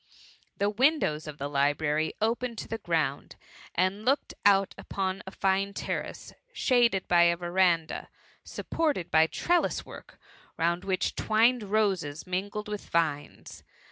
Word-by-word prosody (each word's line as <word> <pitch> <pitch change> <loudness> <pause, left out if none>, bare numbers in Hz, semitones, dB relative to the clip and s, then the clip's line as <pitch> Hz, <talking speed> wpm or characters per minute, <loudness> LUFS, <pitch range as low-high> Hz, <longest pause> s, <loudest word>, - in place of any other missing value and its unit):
The 205 +1 +1
windows 220 - +1
of 150 -1 -7
the 140 - -3
library 145 +2 0
opened 230 +2 -1
to - - -6
the 225 - -4
ground, 160 -7 -1 0.4
and 185 +4 0
looked 275 +4 +1
out 195 -1 +4
upon 190 0 -3
a - - -6
fine 195 +1 0
terrace, - - -5 0.2
shaded 240 - +2
by 175 -1 +5
a 170 0 +3
verandah, 175 -2 +1 0.3
supported 295 - -2
hj 160 0 +5
trelUs* 350 0 0
work, - - -13 0.4
round 170 +2 0
which, 190 -2 0
twined 230 +3 +2
roses 195 -8 0
mingled 200 +3 -3
with 210 -1 -6
vines. 155 -4 -2
190 Hz, 135 wpm, -28 LUFS, 165-215 Hz, 0.4 s, by